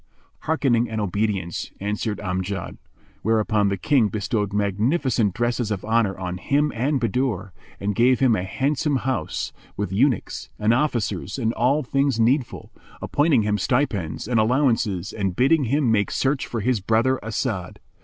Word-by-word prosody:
"Hearkening 125 Hz, -7 st, +2 dB
and 110 Hz, -1 st, -3 dB
obedience," 100 Hz, -3 st, -2 dB
answered 105 Hz, +1 st, -2 dB
Amjad 95 Hz, 0 st, -3 dB, 0.4 s
whereupon 110 Hz, -2 st, +2 dB
the 100 Hz, -, -1 dB
King 120 Hz, +4 st, +3 dB
bestowed 105 Hz, 0 st, -2 dB
magnificent 105 Hz, -, +1 dB
dresses 120 Hz, -1 st, 0 dB
of 100 Hz, -3 st, -3 dB
honour 110 Hz, -3 st, +1 dB
on 90 Hz, -1 st, -4 dB
him 145 Hz, +8 st, +1 dB
and 135 Hz, +5 st, 0 dB
Bahadur 115 Hz, -6 st, -1 dB, 0.3 s
and 100 Hz, +1 st, -1 dB
gave 125 Hz, +4 st, +3 dB
him 130 Hz, -4 st, +4 dB
a 90 Hz, -, -1 dB
handsome 140 Hz, +8 st, 0 dB
house, 130 Hz, -1 st, -2 dB, 0.2 s
with 105 Hz, 0 st, -2 dB
eunuchs 120 Hz, +3 st, 0 dB
and 110 Hz, +2 st, +2 dB
officers 120 Hz, -, -1 dB
and 115 Hz, -3 st, 0 dB
all 135 Hz, +6 st, +2 dB
things 135 Hz, -1 st, 0 dB
needful, 125 Hz, +3 st, 0 dB, 0.3 s
appointing 145 Hz, -6 st, +2 dB
him 105 Hz, 0 st, 0 dB
stipends 105 Hz, -, -1 dB
and 120 Hz, -2 st, +2 dB
allowances 110 Hz, -6 st, +1 dB
and 95 Hz, -4 st, -2 dB
bidding 140 Hz, -, +3 dB
him 135 Hz, 0 st, +1 dB
make 105 Hz, -2 st, +2 dB
search 135 Hz, 0 st, 0 dB
for 115 Hz, -, -3 dB
his 125 Hz, +1 st, +1 dB
brother 115 Hz, +6 st, +1 dB
As'ad. 110 Hz, -5 st, -3 dB
115 Hz, 150 wpm, -23 LUFS, 100-130 Hz, 0.4 s, him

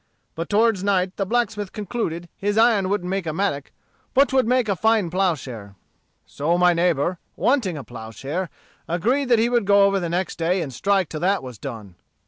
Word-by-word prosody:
But 165 Hz, +1 st, -5 dB
toward 215 Hz, -2 st, +2 dB
night 190 Hz, -2 st, +1 dB
the 195 Hz, -, -1 dB
blacksmith 215 Hz, -3 st, -1 dB
concluded 190 Hz, -5 st, -4 dB
his 205 Hz, +1 st, -2 dB
iron 220 Hz, -5 st, +4 dB
wouldn't 200 Hz, -3 st, -1 dB
make 190 Hz, -2 st, -2 dB
a 155 Hz, -, -2 dB
mattock 160 Hz, -6 st, -2 dB, 0.4 s
but 275 Hz, +2 st, +5 dB
'twould 260 Hz, -4 st, +2 dB
make 250 Hz, -1 st, +2 dB
a 200 Hz, -, +1 dB
fine 220 Hz, -3 st, +2 dB
ploughshare. 135 Hz, -, -2 dB, 0.5 s
"So 165 Hz, +5 st, -1 dB
my 180 Hz, 0 st, +4 dB
neighbor, 170 Hz, 0 st, +1 dB, 0.2 s
wanting 230 Hz, -, +1 dB
a 140 Hz, -, -6 dB
ploughshare, 135 Hz, -, -6 dB, 0.4 s
agreed 245 Hz, +11 st, 0 dB
that 240 Hz, -, +5 dB
he 225 Hz, +1 st, +3 dB
would 240 Hz, -3 st, +1 dB
go 200 Hz, 0 st, +5 dB
over 200 Hz, 0 st, +2 dB
the 175 Hz, -2 st, -3 dB
next 175 Hz, +1 st, -2 dB
day 175 Hz, +2 st, +1 dB
and 135 Hz, -4 st, -7 dB
strike 195 Hz, +6 st, +1 dB
till 155 Hz, -, -5 dB
that 190 Hz, +1 st, +1 dB
was 125 Hz, -5 st, -9 dB
done. 110 Hz, -9 st, -8 dB
185 Hz, 190 wpm, -22 LUFS, 165-210 Hz, 0.5 s, but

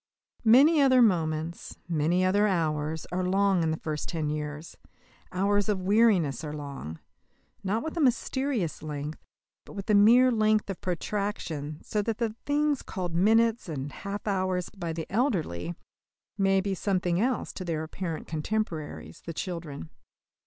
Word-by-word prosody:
Many 285 Hz, +8 st, +7 dB
other 260 Hz, -2 st, +5 dB
moments, 165 Hz, -4 st, 0 dB
many 170 Hz, +3 st, +1 dB
other 205 Hz, +3 st, +3 dB
hours, 160 Hz, -4 st, -1 dB
are 180 Hz, +1 st, -1 dB
long 190 Hz, 0 st, +2 dB
in 160 Hz, -, +1 dB
the 160 Hz, -, -1 dB
first 155 Hz, -2 st, -4 dB
ten 160 Hz, -3 st, -2 dB
years. 150 Hz, +1 st, -5 dB, 0.6 s
Hours 200 Hz, +3 st, +1 dB
of 190 Hz, -3 st, 0 dB
weariness 190 Hz, -, +3 dB
are 150 Hz, -1 st, -5 dB
long 140 Hz, -, -7 dB, 0.7 s
not 205 Hz, +5 st, 0 dB
with 320 Hz, +1 st, -5 dB
a -, -, +1 dB
mysterious 255 Hz, -, 0 dB
length, 150 Hz, 0 st, -5 dB, 0.4 s
but -, -, -13 dB
with 200 Hz, 0 st, -6 dB
a -, -, +4 dB
mere 235 Hz, +5 st, +7 dB
length 215 Hz, -2 st, +2 dB
of 190 Hz, -, -8 dB
protraction, 175 Hz, -5 st, -3 dB
so 210 Hz, -, -1 dB
that 220 Hz, +1 st, -2 dB
the 225 Hz, -3 st, -2 dB
things 290 Hz, -1 st, +1 dB
called 180 Hz, -3 st, -5 dB
minutes 225 Hz, +4 st, +3 dB
and 145 Hz, -2 st, -4 dB
half 200 Hz, +5 st, -6 dB
hours 185 Hz, -3 st, 0 dB
by 175 Hz, -4 st, -5 dB
the 160 Hz, 0 st, -4 dB
elderly 175 Hz, -, -1 dB, 0.6 s
may 195 Hz, -1 st, +3 dB
be 195 Hz, 0 st, -2 dB
something 185 Hz, -2 st, 0 dB
else 250 Hz, 0 st, -1 dB
to 185 Hz, -, -6 dB
their 165 Hz, -3 st, -2 dB
apparent 165 Hz, 0 st, -5 dB
contemporaries, 155 Hz, -, -4 dB
the 165 Hz, -, -3 dB
children. 160 Hz, -, -5 dB
185 Hz, 150 wpm, -28 LUFS, 160-215 Hz, 0.7 s, Many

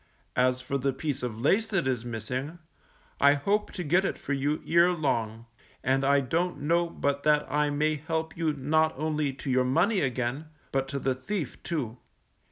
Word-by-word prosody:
As 130 Hz, 0 st, +2 dB
for 140 Hz, +2 st, -2 dB
the 135 Hz, +1 st, 0 dB
piece 140 Hz, +1 st, -3 dB
of 115 Hz, -3 st, -4 dB
lace 200 Hz, -, +2 dB
that 195 Hz, -6 st, 0 dB
is 125 Hz, -3 st, 0 dB
missing, 125 Hz, +7 st, -4 dB, 0.6 s
I 140 Hz, 0 st, +6 dB
hope 200 Hz, +9 st, 0 dB
to 180 Hz, -, -4 dB
get 175 Hz, +5 st, +3 dB
it -, -, -1 dB
for 140 Hz, -, -3 dB
you 145 Hz, +3 st, -1 dB
ere 170 Hz, +2 st, +5 dB
long, 115 Hz, -9 st, -1 dB, 0.4 s
and 135 Hz, +2 st, +2 dB
I 140 Hz, +1 st, +4 dB
don't 165 Hz, +7 st, -1 dB
know 170 Hz, +3 st, +2 dB
but 140 Hz, -3 st, -1 dB
that 150 Hz, 0 st, +3 dB
I 150 Hz, 0 st, +2 dB
may 150 Hz, +1 st, +1 dB
help 160 Hz, +1 st, -3 dB
you 165 Hz, -2 st, 0 dB
not 155 Hz, +3 st, +1 dB
only 155 Hz, -1 st, 0 dB
to 135 Hz, 0 st, -4 dB
your 130 Hz, 0 st, +3 dB
money 170 Hz, -, +2 dB
again, 130 Hz, +2 st, -1 dB, 0.2 s
but 135 Hz, 0 st, 0 dB
to 140 Hz, -, -3 dB
the 135 Hz, -1 st, 0 dB
thief 145 Hz, -, -4 dB
too. 130 Hz, -9 st, -3 dB
145 Hz, 185 wpm, -28 LUFS, 130-160 Hz, 0.6 s, I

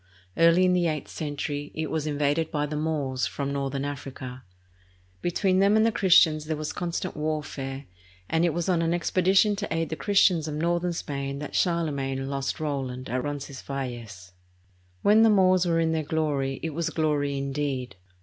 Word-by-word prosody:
Early 170 Hz, +2 st, +5 dB
in 180 Hz, -, +3 dB
the 175 Hz, -1 st, +2 dB
eighth 155 Hz, -3 st, -3 dB
century, 145 Hz, -1 st, -4 dB
it 160 Hz, -1 st, -3 dB
was 155 Hz, -1 st, -1 dB
in 145 Hz, -1 st, -2 dB
vaded 150 Hz, +2 st, +1 dB
by 150 Hz, -1 st, -1 dB
the 150 Hz, +1 st, -5 dB
Moors 150 Hz, -4 st, -1 dB
from 140 Hz, 0 st, -3 dB
northern 140 Hz, 0 st, -2 dB
Africa. 130 Hz, -2 st, -6 dB, 0.8 s
Between 185 Hz, +2 st, +1 dB
them 200 Hz, +2 st, +4 dB
and 220 Hz, -, +4 dB
the 230 Hz, -, +3 dB
Christians 165 Hz, -7 st, +4 dB
there 155 Hz, 0 st, -2 dB
was 155 Hz, +1 st, -4 dB
constant 175 Hz, +1 st, -3 dB
warfare, 145 Hz, -3 st, -4 dB, 0.4 s
and 160 Hz, +1 st, +1 dB
it 175 Hz, -, +3 dB
was 170 Hz, +1 st, -2 dB
on 175 Hz, -3 st, +2 dB
an 165 Hz, +1 st, +1 dB
expedition 190 Hz, +4 st, +3 dB
to 205 Hz, -, -4 dB
aid 165 Hz, -1 st, -1 dB
the 160 Hz, -, -3 dB
Christians 180 Hz, -4 st, +3 dB
of 150 Hz, -, -3 dB
northern 175 Hz, +2 st, 0 dB
Spain 140 Hz, -3 st, -4 dB
that 145 Hz, 0 st, -7 dB
Charlemagne 140 Hz, -6 st, 0 dB
lost 135 Hz, +4 st, -2 dB
Roland 135 Hz, -4 st, -3 dB
at 125 Hz, 0 st, -1 dB
Roncesvalles. 130 Hz, -9 st, -6 dB, 0.7 s
When 215 Hz, +2 st, +6 dB
the 225 Hz, -, +6 dB
Moors 185 Hz, -3 st, +4 dB
were 165 Hz, -1 st, +2 dB
in 165 Hz, -1 st, +2 dB
their 160 Hz, -1 st, 0 dB
glory, 145 Hz, -3 st, -1 dB
it 160 Hz, -2 st, -3 dB
was 165 Hz, +2 st, -1 dB
glory, 145 Hz, -3 st, 0 dB
indeed. 135 Hz, -3 st, -3 dB
155 Hz, 180 wpm, -26 LUFS, 140-170 Hz, 0.8 s, When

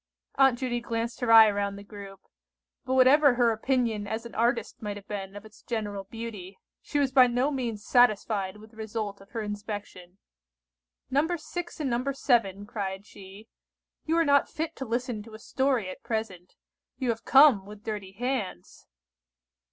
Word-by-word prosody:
Aunt 270 Hz, -3 st, +4 dB
Judy 240 Hz, -1 st, -2 dB
glanced 230 Hz, 0 st, -3 dB
her 245 Hz, -2 st, 0 dB
eye 220 Hz, -1 st, +9 dB
round 200 Hz, 0 st, -2 dB
the 200 Hz, -, -10 dB
group; 200 Hz, -2 st, -11 dB, 0.6 s
but 260 Hz, -, 0 dB
whatever 265 Hz, +1 st, +6 dB
her 240 Hz, -1 st, +3 dB
opinion 225 Hz, -2 st, -1 dB
as 220 Hz, +3 st, -4 dB
an 235 Hz, -, -9 dB
artist 235 Hz, -1 st, -1 dB
might 205 Hz, -2 st, -4 dB
have 200 Hz, -, -13 dB
been 195 Hz, -1 st, -6 dB
of 205 Hz, +1 st, -9 dB
its 215 Hz, -1 st, -16 dB
general 205 Hz, -4 st, -4 dB
beauty, 205 Hz, -4 st, -8 dB, 0.2 s
she 290 Hz, -, -3 dB
was 280 Hz, -2 st, +2 dB
by 260 Hz, -1 st, +7 dB
no 250 Hz, +4 st, 0 dB
means 235 Hz, -6 st, -4 dB
satisfied 210 Hz, -5 st, +2 dB
with 215 Hz, +1 st, -15 dB
the 225 Hz, -, -21 dB
result 215 Hz, -2 st, -5 dB
of 195 Hz, -, -17 dB
her 225 Hz, -2 st, -4 dB
inspection. 205 Hz, -3 st, -7 dB, 0.9 s
"No. 285 Hz, +4 st, +2 dB
6 345 Hz, +2 st, -7 dB
and 290 Hz, -3 st, -1 dB
No. 250 Hz, +4 st, 0 dB
7," 225 Hz, -7 st, +1 dB
cried 195 Hz, -2 st, -5 dB
she, 200 Hz, +2 st, -13 dB, 0.6 s
"you 325 Hz, +1 st, +2 dB
are 335 Hz, -, +3 dB
not 285 Hz, -1 st, +3 dB
fit 320 Hz, +1 st, -4 dB
to 265 Hz, -, -4 dB
listen 240 Hz, -1 st, -2 dB
to 215 Hz, +1 st, -12 dB
a -, -, -8 dB
story 260 Hz, -4 st, 0 dB
at 185 Hz, -, -8 dB
present. 205 Hz, -6 st, -5 dB, 0.4 s
You 255 Hz, -3 st, -2 dB
have 225 Hz, -1 st, -2 dB
come 265 Hz, -9 st, +6 dB
with 210 Hz, 0 st, -12 dB
dirty 205 Hz, -4 st, -5 dB
hands." 230 Hz, -, -4 dB
225 Hz, 175 wpm, -27 LUFS, 205-255 Hz, 0.9 s, eye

